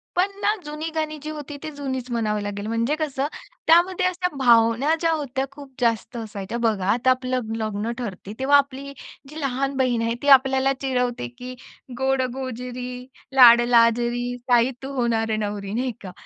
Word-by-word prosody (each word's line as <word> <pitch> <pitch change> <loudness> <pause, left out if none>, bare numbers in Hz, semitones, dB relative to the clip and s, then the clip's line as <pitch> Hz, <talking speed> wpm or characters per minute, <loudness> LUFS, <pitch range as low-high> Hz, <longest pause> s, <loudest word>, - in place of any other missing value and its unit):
पण 370 +3 +2
ना, - - +2 0.2
जुनी 300 +2 -5
गाणी 310 -1 -2
जी 305 - -5
होती 295 -1 -7
ती 310 - -4
जुनीच 260 -3 -5
म्हणावं 215 -3 -1
लागेल, 205 0 -5
म्हणजे 230 +6 0
कसं 285 -2 -1 0.4
त्यामध्ये 350 +3 +4
अशा 365 0 0
भावना 240 +4 +4
ज्या 330 -1 +1
होत्या 275 -4 -2
खूप 275 -1 -12
जास्त 230 0 0
असायच्या. 215 0 -5
बघा, 210 -5 0
आता 245 +2 +1
आपलं 255 -3 -2
लग्न 215 0 -2
ठरते, 205 -3 -6
तेव्हा 280 +2 +5
आपली 280 0 -2 0.4
जी 305 +2 -8
लहान 275 0 -1
बहीण 250 -3 +1
आहे 230 0 0
ती 285 - -4
आपल्याला 265 +1 0
चिडवते 250 - -1
की 255 0 -7 0.4
"गोड-गोजिरी, 250 -1 -3 0.3
लाड-लाजरी, 240 0 +5
ताई 245 +1 +4
तू 270 - -5
होणार 230 -2 0
नवरी" 205 -1 -4
नाही 250 +2 -1
का? 185 -2 -8
250 Hz, 160 wpm, -23 LUFS, 230-275 Hz, 0.4 s, तेव्हा